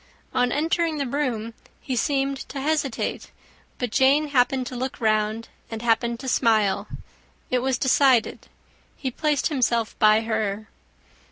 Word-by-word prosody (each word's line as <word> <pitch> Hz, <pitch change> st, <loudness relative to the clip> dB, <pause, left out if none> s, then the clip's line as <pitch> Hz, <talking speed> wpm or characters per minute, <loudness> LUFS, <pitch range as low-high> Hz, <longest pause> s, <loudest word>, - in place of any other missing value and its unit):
On 250 Hz, 0 st, +2 dB
entering 325 Hz, +2 st, 0 dB
the 280 Hz, -, -1 dB
room, 240 Hz, -5 st, -2 dB, 0.3 s
he 260 Hz, -, -4 dB
seemed 275 Hz, +2 st, 0 dB
to 280 Hz, -, -5 dB
hesitate; 290 Hz, -3 st, -2 dB, 0.5 s
but 245 Hz, -3 st, -3 dB
Jane 280 Hz, +5 st, +3 dB
happened 260 Hz, -1 st, +2 dB
to 250 Hz, -, -6 dB
look 255 Hz, +2 st, -4 dB
round, 215 Hz, 0 st, 0 dB, 0.2 s
and 225 Hz, 0 st, -6 dB
happened 235 Hz, 0 st, +1 dB
to 265 Hz, -, -7 dB
smile: 215 Hz, -5 st, +2 dB, 0.6 s
it 250 Hz, -, +2 dB
was 260 Hz, 0 st, 0 dB
decided. 260 Hz, -2 st, +2 dB, 0.5 s
He 265 Hz, -3 st, -3 dB
placed 300 Hz, +3 st, 0 dB
himself 240 Hz, -6 st, 0 dB
by 215 Hz, +1 st, +5 dB
her. 220 Hz, -1 st, -2 dB
250 Hz, 140 wpm, -24 LUFS, 225-275 Hz, 0.6 s, by